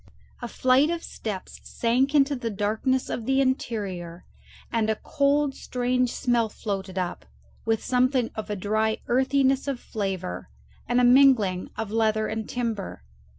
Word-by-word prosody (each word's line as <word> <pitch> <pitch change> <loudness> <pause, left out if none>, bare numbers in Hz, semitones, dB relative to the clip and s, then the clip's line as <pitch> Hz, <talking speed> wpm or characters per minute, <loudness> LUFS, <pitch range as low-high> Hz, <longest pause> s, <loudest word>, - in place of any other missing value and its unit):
A 240 - -4
flight 255 +5 +3
of 340 0 -2
steps 200 -4 -6
sank 255 +5 0
into 280 0 +4
the 245 -3 -3
darkness 220 +6 0
of 225 - -4
the 270 0 +3
interior, 200 -10 -2 0.5
and 225 -2 +1
a 220 - +2
cold 280 +4 +1
strange 250 -1 -1
smell 240 -3 +1
floated 195 -3 -5
up, 180 -1 -3 0.4
with 225 -1 0
something 255 -1 +1
of 215 -1 -6
a 210 - -1
dry 215 +3 0
earthiness 265 +2 +2
of 275 -3 -2
flavour 190 - -4 0.4
and 245 +1 +2
a - - +3
mingling 245 -8 +5
of 220 -2 -4
leather 220 -1 +1
and 220 0 -4
timber. 225 - -3
230 Hz, 150 wpm, -25 LUFS, 210-260 Hz, 0.5 s, mingling